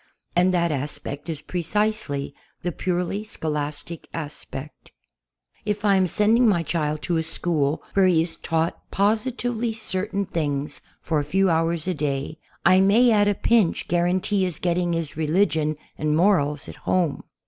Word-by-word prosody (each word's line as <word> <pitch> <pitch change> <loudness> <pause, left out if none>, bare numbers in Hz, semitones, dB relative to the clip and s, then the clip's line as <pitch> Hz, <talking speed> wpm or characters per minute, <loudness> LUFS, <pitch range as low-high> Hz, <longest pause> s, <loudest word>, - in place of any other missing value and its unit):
And 180 +1 +4
that 170 -2 +1
aspect 145 +1 -4
is 155 -2 -4
pre 180 - -3
cisely 210 -7 -1 0.3
the 175 - -1
purely 180 +4 -2
scholastic 150 -4 -4
aspect. 150 -2 -6 0.7
If 210 0 -2
I 200 - +5
am 190 -1 +3
sending 225 +6 +4
my 175 -5 +2
child 155 -2 -2
to 170 - 0
a - - +1
school 160 -2 0
where 195 -1 +4
he 165 -3 +4
is 165 - -6
taught 165 0 -1
positively 230 +2 0
certain 200 -2 -2
things 145 -4 -1 0.2
for 160 -2 0
a - - -1
few 190 +5 +2
hours 165 0 0
a 185 - +1
day, 145 0 -3 0.3
I 185 +2 +6
may 220 +6 +5
at 205 -2 +4
a 205 - +2
pinch 220 -4 +2
guarantee 180 +3 +1
his 180 -4 -1
getting 175 0 0
his 165 -3 -3
religion 155 -1 +1 0.2
and 150 0 +1
morals 155 -6 +2
at - - -9
home. 175 -6 0
170 Hz, 160 wpm, -24 LUFS, 155-200 Hz, 0.7 s, I